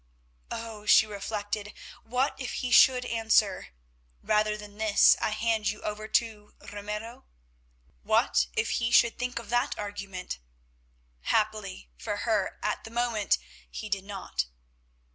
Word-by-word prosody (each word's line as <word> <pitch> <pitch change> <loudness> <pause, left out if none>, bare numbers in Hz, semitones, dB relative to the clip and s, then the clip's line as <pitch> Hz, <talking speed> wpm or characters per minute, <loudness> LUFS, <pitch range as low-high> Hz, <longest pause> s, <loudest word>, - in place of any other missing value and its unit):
Oh! 220 -2 -7
she 220 - +7
reflected, 205 0 -4 0.3
what 250 +4 0
if 260 - -4
he 250 - -2
should 250 0 +6
answer—"Rather 210 - 0
than 210 0 -12
this 220 -2 +6
I - - +1
hand 220 0 0
you 210 - -4
over 210 +1 -4
to 215 -2 -1 0.2
Ramiro"? 210 +3 -6 0.8
What - - +2
if - - 0
he 235 - +1
should 235 -1 +4
think 250 0 -2
of 235 -2 -6
that 240 0 +1
argument? 200 - -6 0.9
Happily 210 - -1
for 60 - -3
her, - - 0
at - - -1
the - - -9
moment 230 -3 +1 0.3
he 215 - -7
did 195 -1 -1
not. 195 - -4
210 Hz, 130 wpm, -28 LUFS, 205-230 Hz, 0.9 s, she